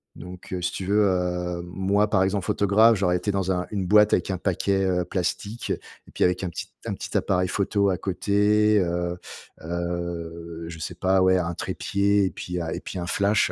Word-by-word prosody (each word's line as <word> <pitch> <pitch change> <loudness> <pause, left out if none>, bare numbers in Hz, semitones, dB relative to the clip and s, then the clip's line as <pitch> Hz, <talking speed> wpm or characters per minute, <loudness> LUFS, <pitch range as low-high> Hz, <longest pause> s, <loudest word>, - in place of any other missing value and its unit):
donc 90 0 -11
heu, 90 - -2
si 90 +1 -1
tu 95 - -4
veux, 105 +2 +3
heu, 90 -2 -1
moi, 95 +4 0
par 95 -3 +3
exemple, 95 0 -1
photographe, 110 +3 +4
j'aurais 90 -2 +2
été 105 - -2
dans 95 -1 -1
un 90 0 -2
une 95 -3 -2
boîte 105 +2 +6
avec 90 - +1
un 95 - -2
paquet, 95 +1 0
heu, 90 -1 +1
plastique 100 +5 -3 0.4
et - - 0
avec 90 +1 +1
un 90 - -1
petit - - -6 0.2
un - - -2
petit - - -7
appareil 90 -1 +1
photo 100 +1 +1
à 95 - 0
côté, 105 +3 +2
heu 85 -1 -1 0.5
heu, 85 -1 -4
je 85 -1 -8
sais 85 +2 -5
pas, 95 +2 +2
ouais, 95 0 +4
un 85 -1 -1
trépied 100 +3 0
et 95 - -1
puis 90 0 -5
un 80 - -3
et - - -3
puis 90 - -6
un 85 - -4
flash. 100 +3 +2
95 Hz, 205 wpm, -25 LUFS, 90-100 Hz, 0.5 s, boîte